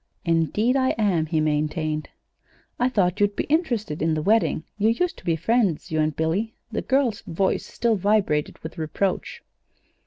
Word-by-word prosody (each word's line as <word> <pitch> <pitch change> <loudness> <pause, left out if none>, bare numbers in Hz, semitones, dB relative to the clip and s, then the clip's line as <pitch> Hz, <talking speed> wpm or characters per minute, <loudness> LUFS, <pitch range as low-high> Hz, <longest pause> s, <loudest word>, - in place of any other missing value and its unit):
"Indeed 170 - +2
I 260 -1 +2
am," 185 -8 +1
he 155 0 0
maintained. 155 0 -1 0.7
"I 245 +1 +3
thought 195 -5 +1
you'd 205 0 +2
be - - -1
interested 240 - -1
in 160 0 +1
the 155 - -1
wedding. 215 -5 +2 0.2
You 215 +2 +4
used 335 +10 0
to - - -19
be 165 - +1
friends 180 -2 0
you 155 - 0
and 155 -1 +1
Billy." 180 +8 -1 0.2
The - - -2
girl's 260 -6 +1
voice 190 +3 0
still 230 -2 0
vibrated 195 -7 +1
with 160 +2 -7
reproach. 180 +5 -2
190 Hz, 165 wpm, -24 LUFS, 160-225 Hz, 0.7 s, You